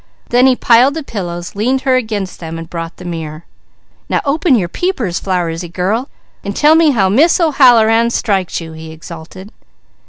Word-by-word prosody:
Then 250 +2 +4
he 260 - +4
piled 250 +4 +4
the 320 - -4
pillows, 175 -8 -6
leaned 255 +6 0
her 260 -2 +2
against 215 -6 -3
them 165 -1 -7
and 165 0 -8
brought 165 0 -7
the 180 - -11
mirror. 160 -2 -6 0.6
"Now - - 0
open 290 0 +2
your 190 -7 0
peepers, 230 - -2
Flowersy 175 -2 -3
girl, 200 +9 -2 0.3
and 200 - -5
tell 300 +1 +4
me 320 -1 +4
how 215 -9 +2
Miss 290 - +3
O'Halloran 235 -7 +4
strikes 195 -7 -1
you!" 165 -1 -9
he 160 0 -10
exulted. 170 +5 -11
205 Hz, 175 wpm, -15 LUFS, 170-255 Hz, 0.6 s, Then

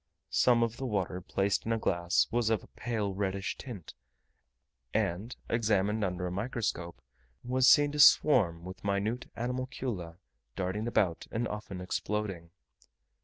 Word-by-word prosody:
Some 120 -2 +4
of 115 0 -2
the 135 - -4
water 95 -4 -2
placed 95 +2 0
in - - 0
a 115 - +2
glass 85 -4 +2
was 120 -1 +1
of 110 -2 +1
a - - -14
pale 110 -4 -3
reddish 95 0 -2
tint; 105 - -8 1.0
and, 100 +9 -1
examined 105 -2 +1
under 90 -1 -2
a 90 - -3
microscope, 95 - -3 0.4
was 125 +1 +2
seen 145 0 +6
to 150 - -4
swarm 105 - +6
with 95 +1 -9
minute 100 +5 -1
animalcula 125 -8 -4 0.4
darting 95 +4 -2
about, 95 -8 +1
and 115 +1 -1
often 105 -3 -6
exploding. 95 -2 -3
105 Hz, 140 wpm, -30 LUFS, 90-120 Hz, 1.0 s, seen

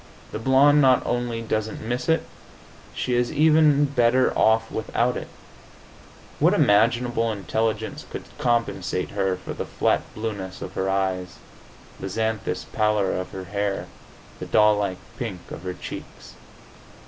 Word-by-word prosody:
The - - -4
blonde 135 +4 +5
not 130 -2 +4
only 120 -1 -2
doesn't 110 -1 -2
miss 120 +6 -3
it; 160 - +3 0.7
she 125 - -1
is 120 0 +1
even 155 -1 +5
better 130 -2 +2
off 110 0 +3
without 120 +2 0
it. - - -5 1.1
What - - +4
imaginable 115 +2 +3
intelligence 110 +2 -2
could - - -6 0.2
compensate 115 -6 0
her 95 -2 0
for - - -7
the - - -4
flat - - +1
blueness 105 -4 -5
of 95 - -7
her 95 0 -1
eyes, 95 -2 -1 0.6
the 95 - -5
xanthous 110 +2 -2
pallor 105 -3 +1
of 90 0 -3
her 95 - -7
hair, 100 +2 -2 0.5
the - - -6
doll 105 0 +5
like 100 -3 -1 0.2
pink 95 -8 -4
of - - -7
her 90 0 -5
cheeks? - - -9
110 Hz, 140 wpm, -24 LUFS, 95-120 Hz, 1.1 s, blonde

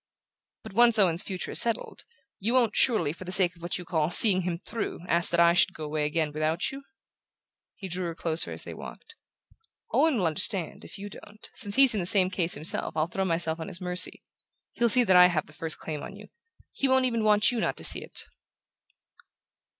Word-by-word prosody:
"But 220 -3 -11
once 235 +1 +4
Owen's 175 -4 +2
future 185 -4 -6
is - - +3
settled, 230 -2 -3 0.3
you 225 +6 -2
won't, 235 -4 +1
surely, 190 - +2
for 180 - -11
the 185 - -8
sake 185 -1 +3
of 170 - -20
what 175 - -2
you 180 - -9
call 160 -3 -1
seeing 185 +1 +7
him 175 -1 -4
through, 205 0 -6
ask 170 0 +1
that 170 - -1
I 170 0 +5
should 185 +1 +1
go 155 - -8
away 150 0 -3
again 150 0 -2
without 155 +2 -2
you?" 275 +1 -9 0.9
He 195 - -9
drew 180 0 -4
her 165 - -6
closer 165 -1 -1
as - - -8
they - - -8
walked. - - -12 0.8
"Owen 315 -5 +1
will 185 - -1
understand, 165 +2 +1
if - - -12
you 200 +1 -8
don't. 205 +1 -13
Since 200 -2 -2
he's 270 -2 +6
in 210 - -2
the 175 - -2
same 185 -1 +2
case 175 -2 +1
himself 155 +2 -1
I'll 155 - +1
throw 190 +3 -4
myself 165 -2 0
on 160 - -7
his 170 - -3
mercy. 180 0 -3 0.5
He'll 235 0 0
see 250 +2 +6
that 190 -5 +2
I 180 0 +7
have 165 -4 -2
the 155 - -18
first 160 +1 -5
claim 150 -2 -7
on - - -10
you; - - -14 0.4
he 275 - -2
won't 260 0 +2
even 230 -3 -1
want 210 +2 +3
you 240 - -3
not - - -2
to - - -9
see - - +2
it." - - -7
180 Hz, 220 wpm, -26 LUFS, 165-215 Hz, 0.9 s, seeing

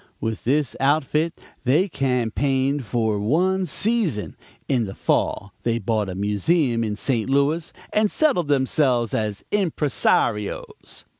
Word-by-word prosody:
With 110 -1 -4
this 140 +2 +1
outfit 150 +3 +1 0.2
they 155 +10 +3
campaigned 135 - 0
for 110 -2 0
one 180 - +1
season; 205 - 0 0.3
in 125 -4 +1
the 95 - -7
fall 100 - -1
they 115 -1 0
bought 110 -2 -1
a 90 - -5
museum 115 - +1
in 105 -2 -2
St. 115 +1 -1
Louis 140 +4 +1 0.2
and 210 0 +3
settled 260 - +1
themselves 130 -4 +1
as 105 -2 -2
impresarios. 145 - -1
130 Hz, 125 wpm, -23 LUFS, 110-155 Hz, 0.3 s, they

